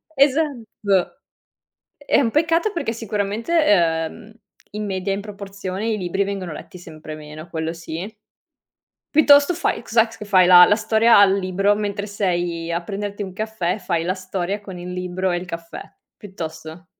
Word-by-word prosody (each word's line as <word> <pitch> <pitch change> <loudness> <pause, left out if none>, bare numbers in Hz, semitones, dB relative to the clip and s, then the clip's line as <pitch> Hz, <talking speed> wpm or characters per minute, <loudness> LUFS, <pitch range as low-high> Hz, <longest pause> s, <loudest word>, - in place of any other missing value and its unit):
esatto. 255 - +1 0.8
È 285 - +1
un 235 -5 +1
peccato 330 +6 +2
perché 335 - -2
sicuramente, 215 - -3 0.6
uhm, 220 0 -14 0.4
in 210 0 -4
media, 190 0 -2
in 195 - -2
proporzione 200 0 -6
i 220 -2 0
libri 190 +1 -1
vengono 195 -3 -4
letti 180 - -10
sempre 155 -3 -10
meno, 155 +2 -10
quello 160 -1 -3
sì. 165 +4 -7 1.0
Piuttosto 290 +1 +6
fai 335 - -1
cos'è 230 -1 +3
c 225 - -13
che 210 - -7
fai, 190 -3 +5
la 180 -1 +9
la 205 - +3
storia 220 +1 +4
al 200 -1 +6
libro, 195 +2 +1
mentre 205 -1 -3
sei 175 -5 -2
a 170 +1 -2
prenderti 205 +1 -5
un 190 -2 -8
caffè 215 -3 -2
fai 170 -4 -1
la 180 +2 0
storia 185 +1 -4
con 190 -3 -9
il 175 +1 -7
libro 180 +1 -2
e 175 - 0
il 175 - -6
caffè, 170 -1 -7 0.3
piuttosto. 160 -3 -8
195 Hz, 160 wpm, -21 LUFS, 175-215 Hz, 1.0 s, la